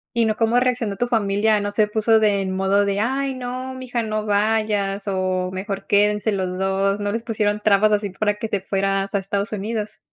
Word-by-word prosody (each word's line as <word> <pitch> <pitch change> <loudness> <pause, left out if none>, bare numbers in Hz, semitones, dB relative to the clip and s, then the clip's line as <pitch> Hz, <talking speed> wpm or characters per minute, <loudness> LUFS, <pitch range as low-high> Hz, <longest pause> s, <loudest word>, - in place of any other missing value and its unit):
Y 235 - +3
no, 215 -1 0
¿cómo 230 +2 +2
reaccionó 245 -5 0
tu 245 - 0
familia? 210 -1 +2
¿No 205 0 -2
se 210 +1 +2
puso 220 +1 +3
de 205 -2 +2
en 190 - -2
modo 195 +2 +2
de: 200 0 0
"Ay 265 +5 -1
no, 255 +1 -5
mi 260 0 -8
hija, 245 -1 -2
no 215 -1 -2
vayas 210 -1 0
o 185 -1 -1
mejor 195 +1 -5
quédense 210 +1 +2
los 185 -2 -2
2", 195 +1 +1
¿no 205 0 -2
les 230 - -2
pusieron 210 -3 -1
trabas 215 0 +4
así, 205 -1 0
para 205 +2 0
que 225 +1 -5
te 205 -2 -1
fueras 195 0 -1
a 200 - +3
Estados 200 +2 -3
Unidos? 210 +1 -4
210 Hz, 215 wpm, -22 LUFS, 195-225 Hz, -, trabas